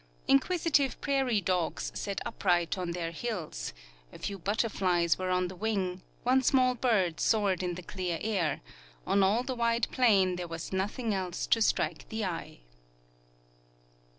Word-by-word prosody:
Inquisitive 295 - +2
prairie 265 -6 +1
dogs 180 -2 -1
sat 200 -1 -3
upright 175 -3 +1
on 180 -2 -3
their 170 -1 -3
hills, 170 - -4 0.4
a - - -11
few 200 -1 -4
butter 205 +6 0
flies 175 -5 +1
were 185 0 -2
on 180 0 +1
the 185 - -8
Aving, 190 -3 -1 0.2
one 255 +2 +4
small 255 -1 +4
bird 210 -10 +1
soared 200 -5 +2
in 180 -1 -2
the 180 - -8
clear 180 -2 -3
air; 195 -8 -1 0.4
on 200 - +3
all 205 +6 +3
the 260 - -3
wide 235 -1 +1
plain 195 -7 +3
there 175 -1 -4
Avas 165 +2 -6
nothing 210 +4 -1
else 185 -2 -2
to 225 - +2
strike - - 0
the 220 -1 -2
eye. 165 - -5
195 Hz, 155 wpm, -30 LUFS, 180-230 Hz, 0.4 s, one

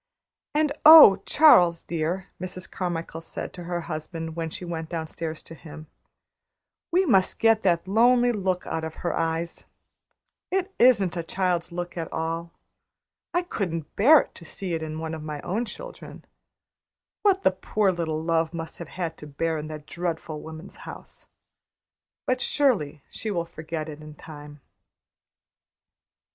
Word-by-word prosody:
"And 305 -1 +2
oh, 300 -12 +10
Charles, 175 - +6
dear," 170 +3 -3
Mrs. 185 0 -5
Carmichael 165 -2 -4
said 165 - -6
to 175 - -9
her 175 0 -2
husband, 160 0 -6
when 165 -1 -3
she 180 - -7
went 165 -2 -5
downstairs 160 -1 -5
to - - -11
him, 155 -1 -11 1.1
"We 370 +3 +3
must 195 - +3
get 225 -1 +4
that 175 -2 +1
lonely 240 +4 +4
look 190 -4 -1
out 160 - -3
of 160 0 -5
her - - 0
eyes! 165 +1 -2 0.8
It 380 +1 -1
isn't 205 -8 +5
a - - 0
child's 175 0 -1
look 175 0 -5
at 165 -1 -4
all. 165 +1 -3 0.8
I 350 +1 +1
couldn't 165 - -4
bear 285 +8 +7
to - - -15
see 180 +2 -5
it 165 - -2
in 155 0 -5
one 160 0 -4
of 160 - -5
my 150 -1 -5
own 215 +7 -2
children. - - -10 1.0
What 390 -2 +3
the - - +5
poor 195 +1 0
little 160 -3 -3
love 165 0 0
must 165 0 -7
have 170 - -7
had 170 -3 -4
to 150 - -10
bear 160 +2 -2
in 150 - -6
that 155 -1 -8
dreadful 165 -3 -4
woman's 160 +4 -10
house! - - -11 1.0
But, 255 0 0
surely, 175 - +1
she 220 - -5
will 170 -5 -1
forget 160 -1 -6
it 155 -1 -9
in 150 0 -11
time." 145 -1 -12
170 Hz, 155 wpm, -25 LUFS, 160-195 Hz, 1.1 s, oh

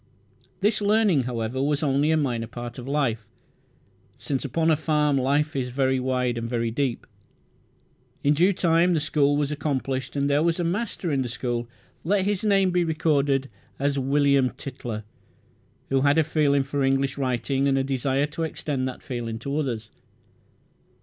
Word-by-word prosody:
This 210 +2 +2
learning, 205 - +3
however, 120 +1 -2
was 145 +2 0
only 140 +1 +2
a 160 - +3
minor 120 -6 -1
part 120 +1 -7
of 125 - -8
life, 125 -7 -1 0.9
since 135 -3 -3
upon 160 +5 +1
a - - +5
farm 150 -1 +1
life 145 +3 +1
is 130 -2 -1
very 130 +1 +1
wide 125 -2 0
and 115 0 -4
very 115 -1 -1
deep. 130 0 -2 1.2
In 145 - +4
due 175 +6 +4
time 175 -1 +3
the - - +2
school 145 -1 +2
was 145 0 0
accomplished, 135 -3 -2
and 140 0 +1
there 145 +1 +2
was 170 +1 +1
a - - +1
master 185 -1 -2
in 135 -2 +1
the 125 - -3
school 120 0 -3 0.3
let 195 +3 +1
his 205 -1 0
name 195 -3 +3
be 180 0 +2
recorded 145 -4 +1 0.3
William 140 -1 +2
Tytler, 120 -5 -7 0.9
who 135 0 +2
had 145 +2 +3
a 160 - +5
feeling 145 -2 +2
for 140 +1 -3
English 135 +1 +1
writing 135 +1 0
and 135 -1 +2
a 135 - +1
desire 135 +1 0
to 150 +2 -6
extend 145 -4 -2
that 130 - -7
feeling 120 -4 -4
to 140 +5 -4
others. 115 -7 -3
140 Hz, 170 wpm, -25 LUFS, 130-155 Hz, 1.2 s, a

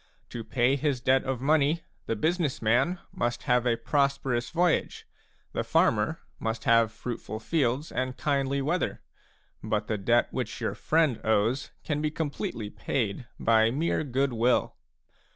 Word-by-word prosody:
To 115 - -6
pay 125 +4 +2
his 140 -3 0
debt 130 +2 +3
of 130 -2 -2
money, 150 +3 +3 0.3
the 115 - 0
business 160 - 0
man 130 +11 +2
must 120 0 -2
have 125 0 +2
a 115 -1 +2
prosperous 135 -2 0
voyage, 175 0 0 0.5
the - - -1
farmer - - +2 0.2
must 110 0 -3
have 115 -1 +4
fruitful 115 -2 -6
fields 140 +2 0
and 130 0 -2
kindly 140 -1 0
weather; 170 +6 -1 0.6
but 105 0 -1
the 105 -1 -2
debt 120 +4 +2
which - - -3
your - - -1
friend 155 -7 +1
owes 110 +4 +1
can 150 -1 -1
be 155 - +1
completely 145 - -4
paid 115 -1 -2
by 110 -1 +4
mere 155 +6 0
goodwill. 125 -3 +1
130 Hz, 145 wpm, -28 LUFS, 115-145 Hz, 0.6 s, have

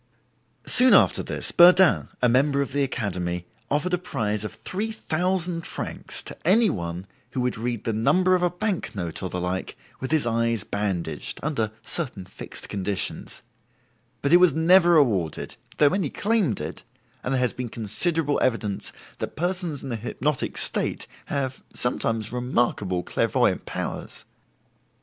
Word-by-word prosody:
Soon 255 0 +6
after - - +5
this - - -2
Burdin, 180 0 +6 0.2
a - - +6
member 140 +4 +3
of 140 - -8
the 145 - +1
Academy, 90 -9 -2 0.2
offered 150 +6 0
a 180 - +2
prize 105 - -2
of 105 - -4
3,000 180 - -1
francs - - -4
to - - -8
any 210 +6 +4
one 85 0 -4 0.3
who 130 - -1
would 125 0 0
read 115 0 -3
the 115 - -1
number 180 +12 +3
of 180 - +3
a 180 - +3
bank 180 - -3
note 85 -5 -4
or 95 - -3
the 90 - -3
like 90 +1 -3 0.2
with 130 - -4
his 155 -5 +2
eyes 115 -2 +1
bandaged 100 -5 -3
(under 115 -8 -1
certain 95 -7 -2
fixed 95 - -8
conditions), 100 -1 -3 0.8
but 140 +3 +2
it - - +10
was 180 -4 +5
never 175 +1 +6
awarded, 100 - +1 0.2
though 145 -1 +5
many 190 -7 0
claimed 200 - 0
it, - - -6 0.4
and 135 - 0
there - - +1
has 125 -1 +1
been 125 -2 -5
considerable 145 - 0
evidence 110 -5 -1 0.3
that - - -5
persons 175 -3 -2
in 135 - -5
the 120 - -2
hypnotic 130 +5 -2
state - - 0 0.2
have 135 -2 -3
(sometimes) 115 -3 -1
remarkable 120 -7 0
clairvoyant - - +1
powers. - - -5
130 Hz, 155 wpm, -25 LUFS, 105-175 Hz, 0.8 s, it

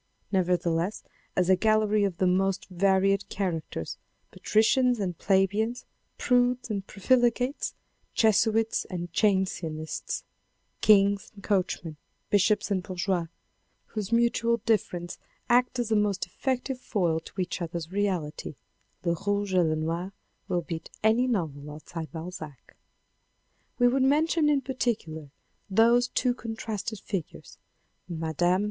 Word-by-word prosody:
Nevertheless, 180 0 0 0.3
as 180 -1 +2
a 190 - +6
gallery 215 0 +2
of 185 -4 -2
the 190 - +2
most 190 +1 +1
varied 195 +2 +2
characters, 165 - -3 0.3
patricians 245 +3 +2
and 185 -4 -2
plebeians, 205 +6 +1 0.3
prudes 245 -2 +2
and 200 -2 -3
profligates, 245 - +1 0.4
Jesuits 220 0 +3
and 175 -2 -6
Jansenists, 175 -6 -1 0.6
Kings 200 -1 +4
and 200 - -13
coachmen, 180 -5 -1 0.3
bishops 205 +1 +3
and 190 -2 +1
bourgeois, 180 -1 -1 0.7
whose 215 -1 -3
mutual 235 0 +2
difference 175 -6 -1 0.3
acts 250 +1 +3
as 235 -2 -1
a - - +4
most 205 -2 +1
effective 260 -1 -2
foil 175 -9 0
to 190 - -12
each 180 0 -2
other's 170 0 -4
reality, 185 -7 -2 0.5
Le 170 - +2
Rouge 205 -1 0
et 185 - +5
Le 160 -2 +2
Noir 165 +5 -3 0.3
will 180 -3 0
beat 160 -1 -6
any 225 +4 +4
novel 155 - -2
outside 155 +2 -7
Balzac. 160 -5 -8 1.0
We 245 - +5
would 260 +2 +2
mention 300 +3 +3
in 285 -2 +3
particular 220 - -3 0.4
those 235 +4 +4
two 250 0 +1
contrasted 220 -2 -5
figures, 190 -7 -6 0.5
Mme. 170 +2 +1
195 Hz, 120 wpm, -27 LUFS, 175-225 Hz, 1.0 s, a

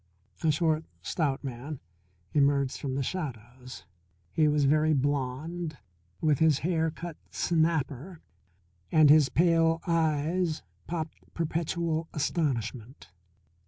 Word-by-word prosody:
A 160 - +3
short, 155 +1 +2 0.2
stout 145 -5 -1
man 135 +2 -6 0.5
emerged 140 -2 +2
from 135 -2 -2
the 135 - 0
shadows. 125 -6 -6 0.5
He 155 - +3
was 150 -1 +3
very 155 +2 +3
blond, 145 +4 -2 0.4
with 150 -3 +2
his 160 -3 +4
hair 160 -2 +1
cut 165 0 -7
snapper, 160 0 0 0.7
and 155 -2 +7
his 150 -3 +6
pale 165 -1 +3
eyes 160 0 +1 0.2
popped 165 -2 -4 0.2
perpetual 165 0 -1
astonishment. 130 - -2
155 Hz, 105 wpm, -29 LUFS, 140-165 Hz, 0.7 s, and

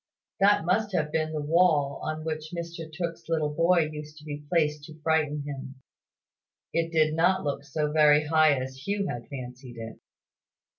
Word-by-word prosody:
That 200 -4 +4
must 205 +3 +1
have 155 -3 0
been 155 0 0
the 155 -2 -3
wall 150 -3 +3
on 155 0 -3
which 155 0 -4
Mr 170 -1 -6
Tooke's 165 0 -5
little 155 -2 0
boy 170 0 +3
used 150 0 -8
to 150 - -13
be 145 -1 -6
placed 150 -3 +1
to 155 0 -12
frighten 150 -2 +1
him. 135 -2 -7 1.0
It 165 0 0
did 155 -2 +3
not 180 +4 +3
look 140 -1 -2
so 150 +1 -2
very 150 -1 +5
high 155 -2 +4
as 130 +3 -7
Hugh 200 0 0
had 120 -6 -5
fancied 125 -2 -8
it. 115 -1 -8
155 Hz, 170 wpm, -27 LUFS, 145-165 Hz, 1.0 s, very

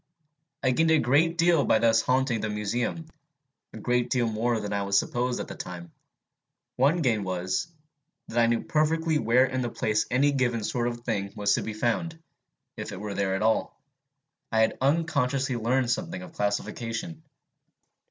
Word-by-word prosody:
I 130 - +3
gained 160 +6 +2
a 160 - +5
great 150 +6 +2
deal 170 -3 +4
by - - +3
thus 115 0 +3
haunting 125 -2 +1
the 110 - -2
Museum 105 +9 -2 0.7
a - - -10
great 125 0 0
deal 125 -3 +1
more 115 +1 0
than 105 -1 -4
I 100 -1 -2
supposed 120 +5 +1
at - - -4
the - - -7
time. 85 -2 -8 0.8
One 150 +6 +2
gain 110 -6 +1
was, 95 0 -2 0.6
that 120 - -1
I 115 - +5
knew 115 0 +1
perfectly 160 0 +1
where 125 +2 +4
in 130 0 -2
the 120 - -2
place 110 -1 0
any 140 +4 +3
given 120 -5 0
sort 120 +3 -1
of 120 0 -4
thing 100 -5 -2
was 105 -1 +2
to - - +1
be 110 - -5
found, 145 +9 -1 0.6
if - - -5
it - - -7
were 105 0 -5
there 95 -1 0
at 95 - -1
all: 110 0 0 0.7
I 110 -1 +3
had 110 - +2
unconsciously 140 -3 +1
learned 120 +2 +1
something 180 +4 -3
of 175 -3 -11
classification. 115 +7 -3
120 Hz, 175 wpm, -27 LUFS, 110-145 Hz, 0.8 s, a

